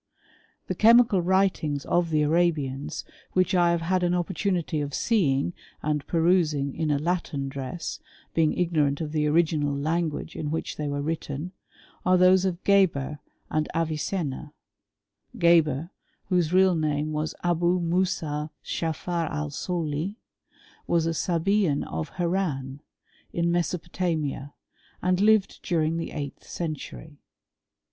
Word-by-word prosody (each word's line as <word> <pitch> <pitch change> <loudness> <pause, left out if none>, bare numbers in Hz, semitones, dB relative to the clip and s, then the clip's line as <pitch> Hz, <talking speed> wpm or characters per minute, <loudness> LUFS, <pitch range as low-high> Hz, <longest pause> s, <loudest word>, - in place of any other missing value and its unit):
The - - -2
chemical 230 -3 +5
writings 175 -6 +1
of 175 -1 +1
the 155 -1 +2
Arabians 150 -3 0 0.3
which 185 +1 +2
I 175 -2 +4
have 170 -1 +1
had 185 +2 +1
an 175 0 +2
opportunity 175 -2 -1
of 145 -1 -3
seeing 170 - +1 0.3
and 150 -1 -1
perusing 160 -5 +2
in 160 -1 -1
a 145 - +2
Latin 155 -3 -2
dress, 135 +4 -5 0.3
being 160 -2 +2
ignorant 155 -5 +1
of 155 -2 -3
the 150 -1 +1
original 150 -2 +2
language 160 +1 -2
in 150 - -3
which 160 +2 -3
they 150 - -3
were 145 0 -2
written, 160 +1 -3 0.5
are 185 0 +4
those 185 +1 +5
of 185 -1 -2
Geber 165 -8 +2 0.3
and 155 0 0
Avicenna, 155 -2 -2 0.8
Geber, 170 -3 +3 0.4
whose 175 -4 +2
real 185 0 +5
name 155 -2 0
was 155 +1 -2
Abou 175 +1 +2
Moussah 165 -4 -1
* - - -39
Dschafar 165 0 -2
Al 150 0 -3
Soli, 165 +4 -3 0.7
was 170 -1 +2
a 165 - 0
Sabean 175 -1 +1
of 80 0 -4
Harran, 160 -7 -1 0.5
in 170 0 0
Me 175 - +3
sopotamia, 165 -5 -3 0.5
and 180 +1 +2
lived 215 -1 +3
during 165 -2 0
the 165 - -3
eighth 140 -2 -6
century. 155 -2 -6
165 Hz, 135 wpm, -26 LUFS, 150-180 Hz, 0.8 s, chemical